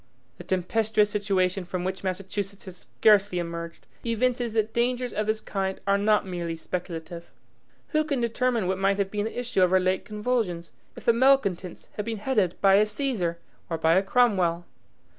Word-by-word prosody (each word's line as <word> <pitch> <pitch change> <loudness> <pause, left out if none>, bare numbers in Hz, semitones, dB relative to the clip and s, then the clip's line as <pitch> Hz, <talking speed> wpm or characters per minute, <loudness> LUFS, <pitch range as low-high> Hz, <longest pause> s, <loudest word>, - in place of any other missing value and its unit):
The - - -7
tempestuous 210 +3 +1
situation 195 -2 0
from 180 0 -4
which 190 +1 -4
Massachusetts 195 +2 -4
has 185 -2 -9
scarcely 205 -1 +3
emerged, 170 -1 -5 0.2
evinces 240 0 0
that 220 0 0
dangers 245 +1 0
of 215 0 -1
this 215 0 +1
kind 190 -1 -3
are 200 0 +2
not 210 0 +3
merely 170 -3 -4
speculative. 170 0 -6 0.6
Who 310 -1 +2
can 290 -4 -1
determine 235 -2 0
what 190 +1 -1
might 195 +1 +2
have 195 -1 -1
been 210 0 -1
the 225 - -4
issue 245 -6 0
of 180 - +5
her 185 +1 +4
late 185 0 0
convulsions, 210 -6 -2 0.2
if - - -12
the 235 - +5
malcontents 230 -9 +1
had 210 - -2
been 225 -1 -3
headed 210 -5 0
by 195 -1 +6
a 210 - +5
Caesar 210 -8 -2 0.3
or 165 - -1
by 160 0 +3
a 190 - +5
Cromwell? 190 -7 +2
200 Hz, 180 wpm, -26 LUFS, 180-225 Hz, 0.6 s, by